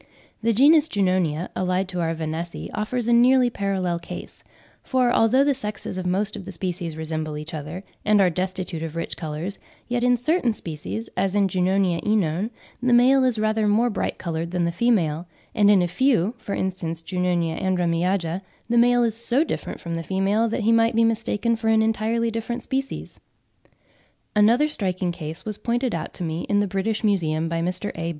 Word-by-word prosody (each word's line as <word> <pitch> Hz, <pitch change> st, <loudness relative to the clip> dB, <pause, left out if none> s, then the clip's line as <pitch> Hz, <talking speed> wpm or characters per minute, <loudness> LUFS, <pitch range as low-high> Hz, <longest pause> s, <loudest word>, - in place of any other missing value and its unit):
The 230 Hz, +1 st, +2 dB
genus 290 Hz, +7 st, +5 dB
Junonia, 185 Hz, -, 0 dB
allied 185 Hz, +1 st, 0 dB
to 180 Hz, -2 st, -4 dB
our 165 Hz, 0 st, -1 dB
Vanessae, 160 Hz, +2 st, -5 dB
offers 225 Hz, +3 st, -2 dB
a 240 Hz, -, +4 dB
nearly 250 Hz, +1 st, +5 dB
parallel 190 Hz, -5 st, -1 dB
case, -, -, -9 dB, 0.4 s
for 255 Hz, -2 st, +1 dB
although 240 Hz, +5 st, +4 dB
the 285 Hz, 0 st, +3 dB
sexes 210 Hz, -7 st, -5 dB
of 185 Hz, -1 st, -3 dB
most 200 Hz, +3 st, 0 dB
of 205 Hz, -, -7 dB
the 195 Hz, -, -8 dB
species 175 Hz, -3 st, -4 dB
resemble 155 Hz, -1 st, -4 dB
each 150 Hz, +2 st, -7 dB
other, 155 Hz, +5 st, -6 dB, 0.2 s
and 210 Hz, -1 st, +4 dB
are 185 Hz, -2 st, +4 dB
destitute 185 Hz, -1 st, -3 dB
of 165 Hz, -1 st, -5 dB
rich 165 Hz, -, -3 dB
colours, 160 Hz, +4 st, -5 dB, 0.3 s
yet 245 Hz, 0 st, -1 dB
in 245 Hz, 0 st, +4 dB
certain 245 Hz, -3 st, +1 dB
species, 165 Hz, +8 st, -6 dB
as 190 Hz, +1 st, 0 dB
in 200 Hz, -1 st, +3 dB
J. 185 Hz, 0 st, -2 dB
oenone, 185 Hz, 0 st, +1 dB, 0.3 s
the 250 Hz, 0 st, +2 dB
male 260 Hz, +3 st, +5 dB
is 250 Hz, -3 st, +2 dB
rather 215 Hz, 0 st, +1 dB
more 230 Hz, +4 st, +3 dB
bright 205 Hz, -, -2 dB
coloured 165 Hz, -1 st, -3 dB
than 175 Hz, -1 st, 0 dB
the 170 Hz, -, 0 dB
female, 170 Hz, -6 st, +1 dB, 0.3 s
and 205 Hz, -1 st, +4 dB
in 195 Hz, -3 st, +5 dB
a -, -, +1 dB
few 220 Hz, +1 st, +2 dB
(for 200 Hz, -, -4 dB
instance 170 Hz, -3 st, -3 dB
J. 180 Hz, +2 st, -6 dB
andremiaja) 175 Hz, 0 st, 0 dB, 0.3 s
the 235 Hz, 0 st, +3 dB
male 245 Hz, 0 st, +4 dB
is 230 Hz, -2 st, +1 dB
so 235 Hz, +5 st, +1 dB
different -, -, -5 dB
from 170 Hz, -, -5 dB
the 165 Hz, -, -2 dB
female 195 Hz, +6 st, +1 dB
that 230 Hz, -, -2 dB
he 220 Hz, +2 st, +3 dB
might 230 Hz, 0 st, +3 dB
be 230 Hz, -, +4 dB
mistaken 230 Hz, 0 st, +1 dB
for 225 Hz, 0 st, -4 dB
an 220 Hz, 0 st, +4 dB
entirely 225 Hz, +1 st, 0 dB
distinct 235 Hz, +2 st, -4 dB
species. 270 Hz, +1 st, -4 dB, 1.2 s
Another 230 Hz, +8 st, +5 dB
striking 185 Hz, -9 st, -1 dB
case 160 Hz, -1 st, -7 dB
was 210 Hz, -1 st, -5 dB
pointed 240 Hz, +1 st, -1 dB
out 165 Hz, -, -3 dB
to -, -, -3 dB
me 160 Hz, 0 st, -2 dB
in 205 Hz, -1 st, +3 dB
the 205 Hz, -, +2 dB
British 200 Hz, +4 st, -2 dB
Museum 165 Hz, -6 st, +1 dB
by 165 Hz, 0 st, -2 dB
Mr. 180 Hz, +4 st, -2 dB
A. 165 Hz, 0 st, -3 dB
195 Hz, 190 wpm, -23 LUFS, 170-230 Hz, 1.2 s, genus